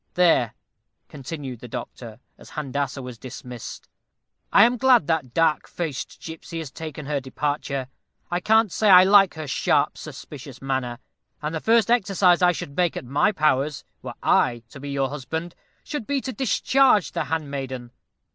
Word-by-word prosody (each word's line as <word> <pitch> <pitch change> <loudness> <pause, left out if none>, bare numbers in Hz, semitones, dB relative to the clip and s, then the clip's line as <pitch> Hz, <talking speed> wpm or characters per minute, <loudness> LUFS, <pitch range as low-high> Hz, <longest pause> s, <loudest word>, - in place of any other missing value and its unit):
There," 165 -11 +3 0.5
continued 140 -3 -7
the 125 - -9
doctor, 115 -1 -8 0.2
as - - -15
Handassah 140 -2 -3
was 125 -3 -8
dismissed 125 -1 -9 0.6
"I 200 - +7
am 240 +2 +3
glad 255 - +5
that 145 -6 -1
dark 165 -2 +2
faced 160 -6 -5
gipsy 165 +1 -8
has 160 -5 -5
taken 155 -2 -7
her 145 0 -1
departure. 140 0 -3 0.4
I 175 - +1
can't 220 +1 +3
say 215 +4 +2
I 185 -1 +10
like 195 -1 +5
her 155 -1 -5
sharp - - +1
suspicious - - -10
manner, 130 -3 -2 0.4
and 150 0 -4
the 160 - -2
first 230 0 +3
exercise 195 -6 +3
I 180 0 +6
should 140 -4 -7
make 175 -2 +1
at - - -6
my 140 - +2
powers, 150 -4 +1 0.2
were - - -7
I 120 -2 +2
to 140 - -11
be 140 +1 -7
your 135 -1 0
husband, 160 +5 -5 0.3
should 295 -8 -5
be 280 -1 0
to 260 - -5
discharge 255 -2 +3
the - - -2
handmaiden. 135 -6 -4
155 Hz, 165 wpm, -24 LUFS, 135-180 Hz, 0.6 s, I